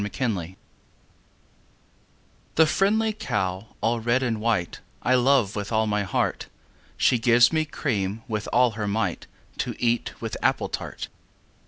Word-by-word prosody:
XXIII 105 +5 -2
The 95 -7 -2
Cow 95 - -15 2.0
The 160 - +6
friendly 215 +6 +2
cow 100 - -2
all 115 +1 +1
red 120 +3 +1
and 115 -4 -1
white, 110 -6 0 0.2
I 125 - +3
love 125 -5 +3
with 105 0 -4
all 110 0 +2
my 105 -1 0
heart: 95 -2 -1 0.5
She 125 - +3
gives 120 +3 +5
me 155 -1 +2
cream 110 -8 -2
with 110 -2 -3
all 125 0 +4
her 105 -1 -4
might, 110 +3 -1 0.3
To - - -2
eat 120 -1 -1
with - - -4
apple - - +1
tart. - - -5
115 Hz, 150 wpm, -25 LUFS, 105-125 Hz, 2.0 s, The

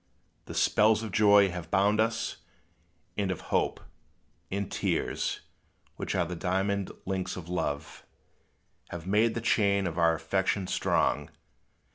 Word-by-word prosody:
The - - -8
spells 110 +1 +3
of 110 - -5
joy 100 -1 +5
have 85 -2 -6
bound 100 +3 +3
us 115 0 -1 0.8
and 100 -2 0
of 95 - -2
hope, - - +1 0.7
And 100 0 -3
tears - - -1 0.5
which - - -3
are - - +2
the 90 +2 -5
diamond 95 +2 -1
links 95 -1 -2
of 85 -2 -8
love 75 -5 -3 0.9
Have 85 -1 -7
made 110 +4 +2
the 115 - -2
chain 100 -4 +2
of 85 -1 -3
our 85 -1 +4
affection 95 +4 0
strong. - - 0
95 Hz, 135 wpm, -29 LUFS, 90-105 Hz, 0.9 s, joy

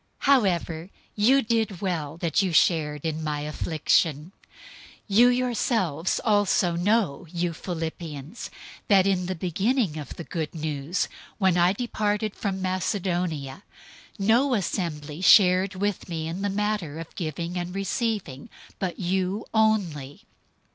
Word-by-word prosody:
004:014 - - -5
However 175 -7 0 0.3
you 255 +6 +4
did 225 -4 0
well 165 -6 -3
that 170 +2 +1
you 190 -2 0
shared 155 -2 +2
in 160 0 -2
my 150 -1 -2
affliction. 155 +1 0 0.8
004:015 200 -1 0
You 245 - +8
yourselves 230 - 0
also 205 -5 +3
know, 185 -4 +1
you 175 -1 -1
Philippians, 160 - -6 0.4
that 195 -2 +5
in 185 -2 +1
the 185 - -2
beginning 190 - 0
of 145 - -8
the 170 - -7
Good 160 -1 -4
News, 155 +2 -2 0.3
when 190 -4 +3
I 175 +1 +4
departed 210 -2 -1
from 190 -2 -3
Macedonia, 180 -6 -2 0.6
no 235 +6 +3
assembly 165 -6 -3
shared 185 -1 +6
with 200 -1 -2
me 160 -2 -3
in 170 +4 -4
the 200 - 0
matter 200 -6 -2
of 165 - -9
giving 170 +1 -4
and 180 +1 -4
receiving 195 - -2 0.3
but 185 -3 -3
you 190 +2 -1
only. 185 -11 0
180 Hz, 135 wpm, -25 LUFS, 160-205 Hz, 0.8 s, You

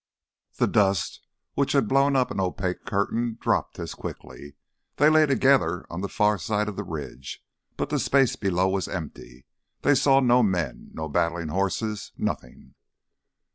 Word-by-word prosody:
The - - +2
dust 95 -3 +1 0.3
which - - 0
had 110 - +3
blown 135 +3 +3
up 130 -1 +2
an - - -3
opaque 95 0 -2
curtain 115 +3 -1
dropped - - 0
as - - -5
quickly. 70 0 -9 0.4
They 150 +2 +5
lay 155 -1 +5
together 130 - +2
on 85 +2 -4
the 100 - -3
far 105 -2 +2
side 105 +4 -1
of 105 - -4
the - - -4
ridge, 70 -5 -7 0.3
but - - -2
the - - +1
space 135 -3 +3
below 95 -2 +1
was 95 0 -1
empty. 70 -7 -8 0.4
They 145 - +5
saw 135 0 +4
no 125 -1 +4
men, 95 -7 -1
no 80 0 -4
battling 85 +1 -1
horses—nothing. 100 - -3
100 Hz, 155 wpm, -25 LUFS, 85-120 Hz, 0.4 s, They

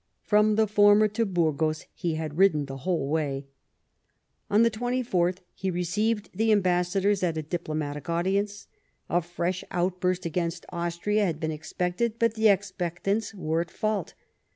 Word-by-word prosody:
From 210 0 +3
the 220 0 +4
former 205 0 +5
to 225 +2 0
Burgos 155 -3 0
he 170 -2 -2
had 155 0 -4
ridden 160 -7 +4
the 135 0 -7
whole 160 0 -1
way. 145 -2 -1 1.0
On 210 +3 +5
the 230 - +4
24th 220 -6 0
he 190 - -3
received 205 +4 -1
the 220 +4 +2
ambassadors 190 0 +2
at 170 -3 0
a 155 - -2
diplomatic 155 -3 -4
audience. 200 +4 0 0.5
A 175 - +3
fresh 175 +2 -3
outburst 180 0 -1
against 170 0 -2
Austria 175 +5 0
had 160 -3 -3
been 160 -1 -2
expected; 180 +8 -2
but 230 -1 +2
the 220 0 +3
expectants 195 +2 -1
were 165 -3 0
at 170 - -5
fault. 215 -3 -2
180 Hz, 150 wpm, -27 LUFS, 165-205 Hz, 1.0 s, former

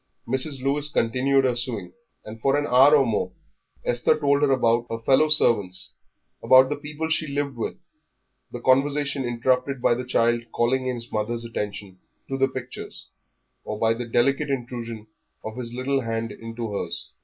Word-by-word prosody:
Mrs. 130 +2 +1
Lewis 145 +2 0
continued 135 +2 +1
her 125 -2 +1
sewing, 120 -6 -4 0.3
and 110 +1 -10
for 135 +3 +2
an 145 - 0
hour 135 +3 +6
or 140 -2 +4
more 110 -3 -1 0.5
Esther 120 +6 +2
told 140 -1 +2
about 120 -4 +2
her 115 - -3
fellow 135 +7 +3
servants, 100 -11 +3 0.5
about 130 0 +6
the 145 - -1
people 150 +2 -5
she 155 0 +1
lived 140 -1 -3
with, 115 - -4 0.7
the - - -6
conversation 140 +1 +2
interrupted 125 +3 0
by 120 - +3
the 125 +2 -3
child 120 -1 +1
calling 130 +2 0
his 120 -2 -4
mother's 115 +2 -2
attention 100 -4 -6 0.3
to 135 - -3
the 135 0 +2
pictures, 130 -1 -8 0.5
or 105 - -5
by 115 +1 +2
the 120 +1 -6
delicate 140 +5 +1
intrusion 120 -4 -5 0.4
of 110 0 -6
his 120 -2 -5
little 130 +3 -1
hand 115 -1 -3
into 115 -1 -6
hers. 100 - -5
125 Hz, 165 wpm, -24 LUFS, 115-140 Hz, 0.7 s, hour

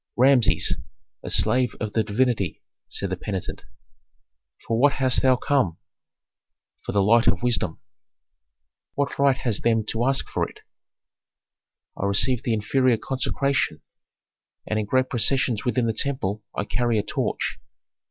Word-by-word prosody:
"Rameses, 130 -2 +4 0.5
a - - -7
slave 125 -2 +2
of 105 -1 -4
the 110 - +2
divinity," 110 -3 -1 0.3
said 100 -2 -2
the - - 0
penitent. 95 -1 -5 1.0
"For 115 0 0
what 140 +2 +5
hast 130 -2 +2
thou 130 -1 +4
come?" 125 - 0 1.1
"For - - -4
the 100 -1 +2
light 115 +3 +4
of - - +2
wisdom." 115 -9 0 1.2
"What 140 -1 -2
right 140 -2 +4
hast 120 -6 -1
them 115 -2 +1
to 115 +2 -1
ask 135 0 +1
for - - -2
it?" - - -17 1.3
"I 100 - -2
received 115 +5 +1
the 115 - +1
inferior 125 +3 +2
consecration, 135 - -1 0.8
and 110 - -1
in 105 - -3
great 130 +3 +2
processions 125 -2 0
within 125 0 +1
the 115 - 0
temple 110 -5 -2
I - - -1
carry 120 +2 0
a 105 - +1
torch." 105 - -2
120 Hz, 145 wpm, -24 LUFS, 105-130 Hz, 1.3 s, what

